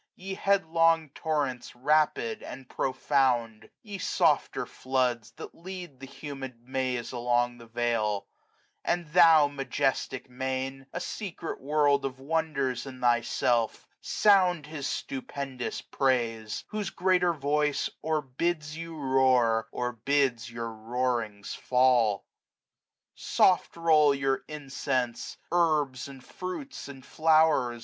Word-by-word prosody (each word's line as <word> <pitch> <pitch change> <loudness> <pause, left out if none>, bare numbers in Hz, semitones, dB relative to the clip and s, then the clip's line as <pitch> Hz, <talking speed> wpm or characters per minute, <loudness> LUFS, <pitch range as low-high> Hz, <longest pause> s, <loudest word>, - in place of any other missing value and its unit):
Ye 190 +1 -6
headlong 165 -5 +2
torrents, 140 -7 -2
rapid, 155 - +1
and 135 -2 -9
profound; 130 -5 0
50 - - -19
Ye 205 -3 -6
softer - - +1
floods, 125 -4 -1
that - - -9
lead 175 -5 -9
the 135 - -9
humid 135 -4 -8
maze 130 -2 -2
Along 120 0 0
the 115 - -13
vale; 115 -3 0 0.6
and 175 0 0
thou, 165 -3 +7
majestic 135 -2 -2
main, 130 +1 -4
A 175 - -4
secret 180 -3 -5
world 145 0 +2
of 135 -1 -3
wonders 140 -4 -1
in 130 -1 -9
thyself, 120 -1 +1
Sound 185 -6 +3
His 150 -2 -5
stupendous 135 -1 -4
praise; 115 -5 -1
whofe 210 -1 -4
greater 180 -1 +3
voice 150 -1 0
Or 155 -1 0
bids 150 +3 -2
you 165 0 -7
roar, 130 -5 +3
or 125 0 -2
bids 125 0 0
your 115 -1 -5
roarings 115 -2 -2
fall. 125 -5 +3 1.0
^^ - - -20
Soft 180 -2 +2
roll 155 -4 +5
your 135 -1 0
incense, 135 -4 -3
herbs, 150 -7 +1
andfruits, 180 - -7
andflow'rs. 140 -2 +2
135 Hz, 115 wpm, -28 LUFS, 125-155 Hz, 1.0 s, thou